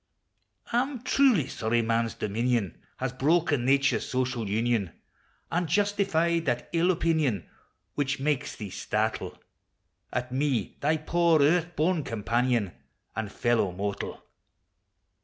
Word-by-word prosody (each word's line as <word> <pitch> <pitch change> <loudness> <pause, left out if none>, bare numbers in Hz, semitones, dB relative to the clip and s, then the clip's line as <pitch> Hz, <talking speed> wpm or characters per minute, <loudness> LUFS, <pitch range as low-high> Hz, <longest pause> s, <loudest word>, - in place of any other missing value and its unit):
T - - -1
'm 255 0 0
truly 255 - +4
sorry 115 -2 0
man's 115 0 0
dominion 110 -2 -1 0.2
Has 130 -1 -3
broken 145 -1 +2
nature's 135 +1 +3
social 125 -4 -1
union, 110 -3 0 0.6
An' 175 0 0
justifies 195 -4 +1
that 120 -3 -2
ill 170 +2 +3
opinion 160 - +1 0.5
Which 140 -2 -1
makes 150 0 -1
thee 105 -4 -7
startle 110 +3 -2 0.7
At 125 0 -3
me, 130 -6 -1
thy 155 +3 +2
poor 165 +1 +2
earth 175 +3 +2
born 165 0 +1
companion, 115 -2 0 0.4
An' 110 -1 -3
fellow 115 -2 +1
mortal 100 +2 -4
130 Hz, 120 wpm, -27 LUFS, 115-165 Hz, 0.7 s, truly